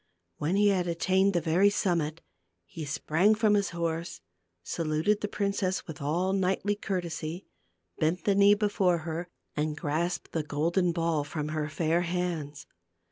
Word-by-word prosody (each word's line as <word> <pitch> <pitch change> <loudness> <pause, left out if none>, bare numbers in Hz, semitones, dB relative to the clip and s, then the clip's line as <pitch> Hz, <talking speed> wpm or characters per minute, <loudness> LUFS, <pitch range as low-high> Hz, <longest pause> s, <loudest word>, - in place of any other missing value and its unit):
When 160 +5 0
he 205 0 +4
had 185 -3 +1
attained 190 +3 +2
the 175 - +2
very 175 +5 +4
summit, 165 -5 -1 0.4
he 155 - -7
sprang 165 +8 +2
from 215 -1 +3
his 200 -1 +2
horse, 170 0 -3 0.4
saluted 165 - 0
the 210 - -1
princess 200 -2 -1
with 160 -4 -8
all 175 +7 0
knightly 195 +1 +1
courtesy, 175 -3 -4 0.5
bent 160 +4 +1
the 200 - +4
knee 200 +1 +6
before 200 -4 +2
her, 170 +1 -3 0.3
and 150 0 -1
grasped 165 +3 -2
the 160 - -1
golden 165 +5 +1
ball 165 -3 0
from 150 +1 -4
her 155 -1 -2
fair 165 +2 +1
hands. 170 -5 -3
170 Hz, 150 wpm, -29 LUFS, 155-195 Hz, 0.5 s, knee